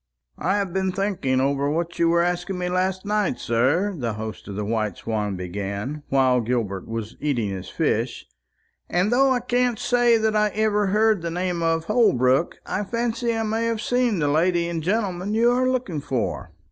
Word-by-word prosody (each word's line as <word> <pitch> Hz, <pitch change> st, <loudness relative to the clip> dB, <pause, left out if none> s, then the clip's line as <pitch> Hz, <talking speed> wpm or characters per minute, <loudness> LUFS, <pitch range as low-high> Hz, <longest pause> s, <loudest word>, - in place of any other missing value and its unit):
"I 190 Hz, +5 st, +1 dB
have 195 Hz, -4 st, -2 dB
been 190 Hz, 0 st, 0 dB
thinking 185 Hz, -9 st, 0 dB
over 140 Hz, +1 st, +1 dB
what 170 Hz, +3 st, -2 dB
you 170 Hz, -1 st, +4 dB
were 170 Hz, 0 st, +3 dB
asking 175 Hz, +2 st, -2 dB
me 180 Hz, 0 st, -2 dB
last 185 Hz, +1 st, -1 dB
night, 210 Hz, -2 st, 0 dB
sir," 140 Hz, -, +1 dB
the 120 Hz, -7 st, -2 dB
host 110 Hz, 0 st, -7 dB
of 100 Hz, -, -6 dB
the 105 Hz, +1 st, -3 dB
White 110 Hz, -3 st, -1 dB
Swan 105 Hz, -3 st, -2 dB
began, 100 Hz, +9 st, -4 dB
while 130 Hz, -2 st, +3 dB
Gilbert 110 Hz, -5 st, -2 dB
was 115 Hz, -1 st, -5 dB
eating 125 Hz, -8 st, -1 dB
his 95 Hz, -1 st, -6 dB
fish; -, -, -1 dB, 0.6 s
"and 180 Hz, +5 st, +1 dB
though 270 Hz, +2 st, +4 dB
I 250 Hz, -1 st, +1 dB
can't 245 Hz, -1 st, +1 dB
say 240 Hz, 0 st, +3 dB
that 220 Hz, -1 st, 0 dB
I 210 Hz, 0 st, +3 dB
ever 210 Hz, -1 st, +2 dB
heard 215 Hz, 0 st, +3 dB
the 170 Hz, -, -3 dB
name 180 Hz, 0 st, -2 dB
of 165 Hz, 0 st, +1 dB
Holbrook, 150 Hz, -, +2 dB
I 205 Hz, -, -2 dB
fancy 235 Hz, +2 st, -1 dB
I 225 Hz, -, 0 dB
may 220 Hz, +1 st, -1 dB
have 230 Hz, -1 st, -1 dB
seen 245 Hz, -2 st, +1 dB
the 150 Hz, -3 st, +1 dB
lady 170 Hz, +3 st, +2 dB
and 170 Hz, -1 st, -3 dB
gentleman 195 Hz, +1 st, -1 dB
you 235 Hz, +2 st, +4 dB
are 255 Hz, +1 st, +2 dB
looking 240 Hz, -, -2 dB
for." 130 Hz, -4 st, -3 dB
175 Hz, 190 wpm, -23 LUFS, 130-215 Hz, 0.6 s, you